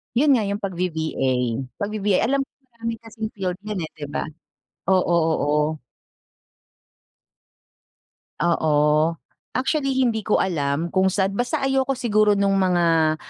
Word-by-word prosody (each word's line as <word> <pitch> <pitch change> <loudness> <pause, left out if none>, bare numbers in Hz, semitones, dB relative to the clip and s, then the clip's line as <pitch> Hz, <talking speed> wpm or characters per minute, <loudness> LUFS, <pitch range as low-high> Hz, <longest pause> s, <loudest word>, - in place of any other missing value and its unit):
Yun 285 +3 +4
nga 220 -6 +3
yung 200 0 -3
pag-V-VA, 170 -7 -2 0.5
pag-V-VA, 205 -2 0
alam 275 +4 +1
ko 275 - -4 0.2
marami 230 0 -4
kasing 220 -1 -5
field 185 -2 -3
'yan 195 -6 -3
eh, 155 - -6
'di 150 -2 -8
ba? 145 - -3 0.7
Oo, 180 -2 +3 0.2
oo. 150 +1 0 2.6
Oo. 170 -2 +1 0.9
Actually 270 0 0
hindi 240 -4 +2
ko 215 0 0
alam 160 -1 0
kung 190 0 +3
saan, 190 +1 +1
basta 245 +5 -1
ayoko 270 0 +1
siguro 215 -4 +3
nung 195 -1 +2
mga, 165 -4 +3
195 Hz, 125 wpm, -23 LUFS, 170-230 Hz, 2.6 s, Yun